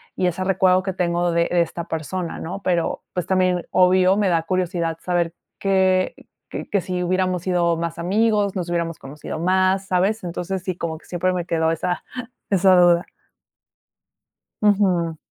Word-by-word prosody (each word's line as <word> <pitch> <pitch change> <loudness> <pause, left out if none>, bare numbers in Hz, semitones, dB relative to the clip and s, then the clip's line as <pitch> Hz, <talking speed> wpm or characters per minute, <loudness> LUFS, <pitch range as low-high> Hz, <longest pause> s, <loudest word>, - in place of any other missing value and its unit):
y 185 - +1
ese 180 +2 -2
recuerdo 185 -1 +3
que 190 -1 -3
tengo 175 -1 0
de 170 0 +2
de 175 -1 +3
esta 170 0 -3
persona, 165 +2 -4
¿no? 190 +4 -6
Pero, 175 -2 0
pues 180 - -2
también, 185 -2 +1
obvio, 185 +1 +4
me 205 - +2
da 165 -2 +1
curiosidad 170 -2 -1
saber 175 -2 0 0.3
que 190 -1 +2 0.4
que - - -6
que 200 -3 +1
si 180 0 -3
hubiéramos 185 -1 0
sido 175 -2 +1
más 170 0 -3
amigos, 205 +2 +1
nos 180 -2 -3
hubiéramos 170 -1 -2
conocido 150 +3 -7
más, 185 +2 +2
¿sabes? 195 +4 +1
Entonces, 180 +2 -4
sí, 185 -1 -3
como 160 -2 -3
que - - -19
siempre 185 +1 0
me 175 -2 -2
quedó 160 -1 +1
esa 175 +2 -2 0.5
esa 190 -1 +5
duda. 175 0 +4 1.5
Ujú. 185 -6 +2
180 Hz, 165 wpm, -22 LUFS, 170-185 Hz, 1.5 s, esa